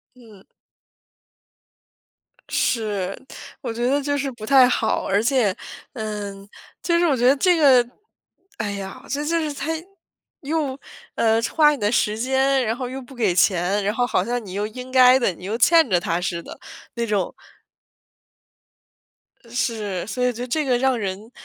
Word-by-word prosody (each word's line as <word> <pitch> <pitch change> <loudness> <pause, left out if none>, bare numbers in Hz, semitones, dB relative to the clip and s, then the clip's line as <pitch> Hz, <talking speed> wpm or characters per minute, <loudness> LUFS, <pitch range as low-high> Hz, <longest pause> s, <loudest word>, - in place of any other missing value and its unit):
嗯。 220 -6 -17 2.1
是， 205 -5 -1 0.4
我 - - -4
觉 240 +2 -2
得 280 +3 +2
就 285 +1 -1
是 275 -1 -2
不 220 -3 -11
太 260 -1 +6
好， - - 0
而 200 +2 +1
且， 235 -6 +2 0.4
嗯 205 -4 -6 0.3
就 340 -1 +2
是 345 - +3
我 280 -5 +2
觉 245 - +1
得 275 - +5
这 360 +4 +3
个 260 -6 +5 0.7
哎 205 -1 -2
呀， 200 +6 -7
这 290 +1 -2
就 335 +2 0
是 305 -2 -2
它 285 +2 -5 0.7
又， 285 -2 -2 0.4
呃， 225 0 +2
花 300 +4 +4
你 - - -2
的 205 0 0
时 215 -2 +1
间， 265 +1 +1
然 225 0 -1
后 250 -1 -4
又 260 +2 -6
不 255 +2 -14
给 215 -8 +1
钱， 190 +1 +2
然 205 +2 0
后 245 0 +1
好 - - 0
像 240 -1 -3
你 185 - -9
又 205 +2 -2
应 250 +4 -9
该 255 0 +6
的、 235 -7 +1
你 180 - -14
又 215 +4 -2
欠 325 +3 +5
着 180 -2 +3
他 170 +1 -1
似 170 -2 -3
的 - - -11 0.4
那 235 -1 -2
种。 205 -3 -1 2.2
是， 220 -6 -2
所 250 +3 -4
以 250 0 +2
就 245 +2 -6
这 305 +5 -1
个 255 -3 +2
让 260 -1 +1
人， 200 +2 -5
240 Hz, 180 characters per minute, -22 LUFS, 205-265 Hz, 2.2 s, 太